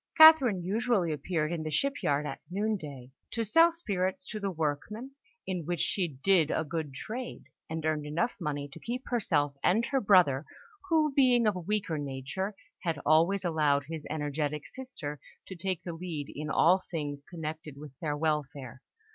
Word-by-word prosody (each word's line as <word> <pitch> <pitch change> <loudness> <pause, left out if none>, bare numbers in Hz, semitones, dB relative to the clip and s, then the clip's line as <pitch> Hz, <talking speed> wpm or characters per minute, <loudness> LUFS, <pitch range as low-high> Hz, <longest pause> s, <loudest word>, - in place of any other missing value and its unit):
Catherine 290 - +8
usually 205 -2 +1
appeared 155 +1 -1
in 170 -2 -2
the 155 - -3
shipyard 150 - +1
at - - -5
noon 210 +4 0
day, 140 -8 -8 0.2
to 230 - 0
sell 330 +11 +6
spirits 205 - -2
to 215 - -4
the 200 -1 -1
workmen, 180 - -3 0.3
in 180 -3 -2
which 175 +2 -2
she 185 -3 +1
did 160 +3 +2
a 160 - 0
good 160 -1 -4
trade, 230 - -6 0.3
and 160 0 -3
earned 155 -1 0
enough 170 +10 0
money 145 -4 -3
to - - -10
keep 250 +2 -4
herself 155 - +1
and 220 +6 +3
her 270 0 0
brother, 180 -9 +5 0.5
who, 310 -3 +3
being 250 -4 +4
of 210 -2 +3
a - - -3
weaker 180 -3 -1
nature, 145 +9 -4 0.3
had 165 -4 -1
always 170 +5 +4
allowed 150 -4 +2
his 160 0 -6
energetic 150 -1 -2
sister 180 - -7 0.3
to 190 - -8
take 180 -1 -3
the 170 - -5
lead 165 -4 -5
in 150 +1 -4
all 180 +5 +5
things 145 -4 -4
connected 155 -3 -6
with 150 -1 -9
their 150 -3 -2
welfare. 145 -5 -2
165 Hz, 170 wpm, -30 LUFS, 150-210 Hz, 0.5 s, Catherine